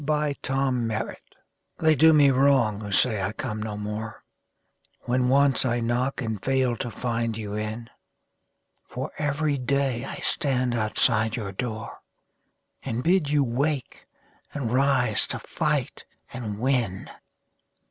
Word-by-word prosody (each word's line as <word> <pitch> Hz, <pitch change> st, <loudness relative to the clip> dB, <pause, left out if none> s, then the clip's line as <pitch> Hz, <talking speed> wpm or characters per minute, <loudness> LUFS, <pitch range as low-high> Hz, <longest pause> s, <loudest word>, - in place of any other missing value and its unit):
OPPORTUNITY 135 Hz, -6 st, 0 dB, 0.6 s
They 160 Hz, -1 st, +4 dB
do 160 Hz, +3 st, +6 dB
me 145 Hz, -3 st, +6 dB
wrong 130 Hz, -6 st, +3 dB
who 105 Hz, -1 st, -6 dB
say 110 Hz, +1 st, +2 dB
I 95 Hz, +3 st, -2 dB
come 105 Hz, 0 st, -4 dB
no 105 Hz, -1 st, -4 dB
more 105 Hz, +1 st, -5 dB, 0.8 s
When 125 Hz, 0 st, +1 dB
once 140 Hz, 0 st, +4 dB
I 120 Hz, -2 st, +1 dB
knock 125 Hz, +3 st, -1 dB
and 110 Hz, -4 st, -4 dB
fail 130 Hz, -2 st, +1 dB
to 120 Hz, -, -3 dB
find 115 Hz, -1 st, -2 dB
you 105 Hz, -2 st, -5 dB
in; 110 Hz, +2 st, -4 dB, 1.0 s
For 130 Hz, +4 st, -5 dB
every 145 Hz, -1 st, 0 dB
day 130 Hz, -1 st, 0 dB
I -, -, -6 dB
stand 130 Hz, -3 st, 0 dB
outside 110 Hz, 0 st, +1 dB
your 105 Hz, -5 st, -4 dB
door, 110 Hz, +2 st, -5 dB, 0.8 s
And 125 Hz, -1 st, -3 dB
bid 175 Hz, -2 st, +3 dB
you 145 Hz, -1 st, +3 dB
wake, 135 Hz, +2 st, -2 dB, 0.5 s
and 130 Hz, -6 st, -2 dB
rise 130 Hz, -4 st, +2 dB
to -, -, -3 dB
fight -, -, -2 dB, 0.3 s
and 110 Hz, -5 st, -5 dB
win. 120 Hz, -6 st, 0 dB
125 Hz, 130 wpm, -25 LUFS, 110-135 Hz, 1.0 s, do